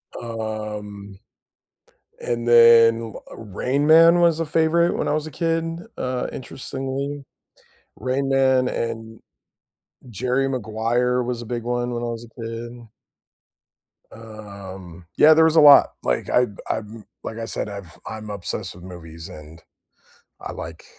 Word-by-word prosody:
Um, 105 -3 -6 1.0
and 120 0 -3
then, 115 -1 +6 0.2
uh, - - -10
Rain 125 +7 -2
Man 165 +2 +7
was 170 -2 +3
a 165 - -1
favorite 165 +2 +2
when - - -2
I - - +1
was 155 0 -1
a - - -7
kid, 165 +1 -1 0.3
uh, 125 0 -2
interestingly, 135 +2 -5 0.7
Rain 135 +2 -1
Man 130 -1 +3
and 115 -2 -5 0.9
Jerry 125 +5 0
Maguire 120 0 0
was 120 -1 -3
a - - -8
big 120 0 -4
one 120 0 -2
when 120 0 -3
I - - -1
was 115 0 -5
a 115 +1 -14
kid. 115 +1 -7 1.2
Um, 100 -6 -11
yeah, 155 +1 +8
there 160 +1 +5
was 160 0 +2
a 160 - +7
lot, 145 -1 +8
like - - -1
I 125 0 +3 0.2
I'm 110 0 -5 0.2
like 110 - -6
I 115 - -4
said, 110 - -4
I've 100 -6 -9
I'm 110 -1 -7
obsessed 100 -4 -5
with 90 - -13
movies 85 -3 -10
and 75 +2 -12 0.8
I - - -6
like 80 0 -8
120 Hz, 145 wpm, -22 LUFS, 110-135 Hz, 1.2 s, yeah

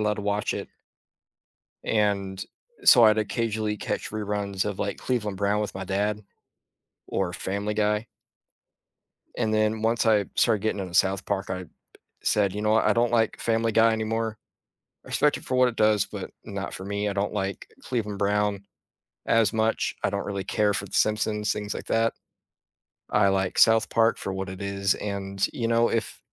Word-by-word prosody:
allowed 105 0 +1
to 105 - -6
watch 105 +1 -1
it - - -5 1.2
and 100 -3 0 0.4
so 120 -2 +8
I'd 110 0 +5
occasionally 110 0 -1
catch - - -3
reruns 105 -2 -2
of, 105 -2 -3
like, 100 - -2
Cleveland 105 -6 -2
Brown 100 +1 +1
with 105 - -3
my 95 0 -5
dad, 105 +2 -1 0.9
or 90 -2 -1
Family 100 +4 -3
Guy 105 +1 +1 1.3
and 110 -2 0
then 110 0 +1
once 115 +1 +1
I 105 -3 +4
started 105 -3 +3
getting 110 -2 -1
into 90 -2 -6
South 95 +2 +2
Park, 100 -1 -2
I 90 0 -3 0.6
said, 100 -3 +2
"You 105 - -3
know 105 0 +2
what? 110 - +3
I - - +5
don't 120 0 +1
like 115 -2 +1
Family 115 0 +1
Guy 115 +1 +5
anymore." 110 0 -2 0.7
I - - -13
respect - - +2
it - - -12
for 130 - -1
what 125 0 +5
it 115 - -8
does, 105 -1 +3
but - - -7
not - - -5
for 95 - -7
me. 100 +1 -2
I - - -2
don't 100 +1 -1
like 95 -2 -3 0.2
Cleveland 105 -5 -3
Brown 105 0 0 0.6
as 115 -2 +3
much. 110 0 0
I - - +2
don't - - -2
really 100 -2 -4
care 105 -2 +1
for - - -3
The - - -16
Simpsons, 105 -1 +1
things 105 0 -4
like - - -7
that. 115 0 +1 1.0
I - - +4
like 95 -1 0
South 110 0 +5
Park 115 0 +3
for 95 - -4
what 95 0 -4
it 95 +1 -8
is, 100 0 0
and 100 -1 -2
you 115 -3 -2
know, 115 0 +3
if 115 -1 -2
105 Hz, 180 wpm, -26 LUFS, 100-110 Hz, 1.3 s, so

